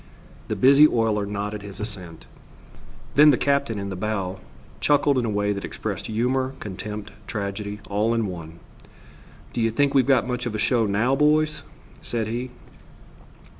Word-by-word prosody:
The -, -, -2 dB
busy 140 Hz, +3 st, +7 dB
oiler 110 Hz, -5 st, 0 dB
nodded 105 Hz, +1 st, -4 dB
his 100 Hz, -1 st, -9 dB
assent. 95 Hz, -6 st, -6 dB, 0.9 s
Then 150 Hz, +1 st, +7 dB
the 135 Hz, -, +5 dB
captain, 140 Hz, -5 st, +1 dB
in 100 Hz, 0 st, -4 dB
the 95 Hz, -, -4 dB
bow, 95 Hz, -2 st, -3 dB, 0.4 s
chuckled 145 Hz, -2 st, +3 dB
in 120 Hz, -, -1 dB
a -, -, -1 dB
way 105 Hz, 0 st, 0 dB
that 100 Hz, -, -5 dB
expressed -, -, -5 dB
humor, 130 Hz, +4 st, 0 dB
contempt, 105 Hz, +1 st, -6 dB, 0.2 s
tragedy, 100 Hz, 0 st, -4 dB
all 105 Hz, +3 st, +1 dB
in 115 Hz, -1 st, +1 dB
one. 85 Hz, -3 st, -7 dB, 0.9 s
"Do 120 Hz, -, -1 dB
you 115 Hz, -, +3 dB
think 140 Hz, +5 st, +1 dB
We've 135 Hz, -2 st, +4 dB
got 135 Hz, -2 st, +3 dB
much 125 Hz, 0 st, -2 dB
of 110 Hz, -, -4 dB
a -, -, 0 dB
show 115 Hz, 0 st, +2 dB
now, 110 Hz, +7 st, +2 dB
boys?" 150 Hz, +2 st, +2 dB, 0.4 s
said 115 Hz, -2 st, -2 dB
he. 120 Hz, +4 st, -3 dB
110 Hz, 165 wpm, -24 LUFS, 100-130 Hz, 0.9 s, busy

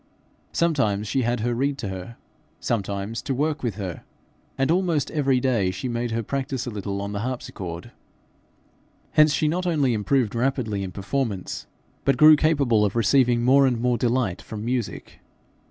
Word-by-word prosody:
Sometimes 110 Hz, -12 st, +1 dB
she 135 Hz, +5 st, 0 dB
had 120 Hz, -1 st, 0 dB
her 120 Hz, -, 0 dB
to -, -, 0 dB
read 135 Hz, +3 st, 0 dB
to 100 Hz, -, -4 dB
her, 95 Hz, +5 st, -7 dB, 0.4 s
sometimes 100 Hz, 0 st, -2 dB
to 135 Hz, -, -2 dB
work 155 Hz, +3 st, -1 dB
with 115 Hz, -6 st, -2 dB
her, 95 Hz, -5 st, -6 dB, 0.5 s
and 135 Hz, +3 st, +2 dB
almost 170 Hz, -5 st, +1 dB
every 135 Hz, -4 st, +2 dB
day 120 Hz, -7 st, +1 dB
she 95 Hz, +6 st, -4 dB
made 120 Hz, 0 st, -2 dB
her 115 Hz, 0 st, -2 dB
practise 135 Hz, +1 st, -3 dB
a 120 Hz, -, -4 dB
little 100 Hz, -1 st, -4 dB
on 100 Hz, -, -4 dB
the 100 Hz, -, -3 dB
harpsichord. 100 Hz, -8 st, -5 dB, 1.2 s
Hence 155 Hz, 0 st, +5 dB
she 150 Hz, -, +1 dB
not 180 Hz, +4 st, -1 dB
only 145 Hz, -7 st, +2 dB
improved 115 Hz, +1 st, +1 dB
rapidly 120 Hz, -4 st, -1 dB
in 95 Hz, -1 st, -4 dB
performance, 100 Hz, 0 st, -3 dB, 0.4 s
but 135 Hz, -2 st, +2 dB
grew 155 Hz, +2 st, +9 dB
capable 140 Hz, -8 st, +2 dB
of 105 Hz, -, 0 dB
receiving 120 Hz, +1 st, +3 dB
more 135 Hz, +2 st, +5 dB
and 120 Hz, -3 st, 0 dB
more 125 Hz, +1 st, +1 dB
delight 115 Hz, -7 st, 0 dB
from 105 Hz, +3 st, -7 dB
music. 120 Hz, -2 st, -4 dB
120 Hz, 170 wpm, -24 LUFS, 105-140 Hz, 1.2 s, grew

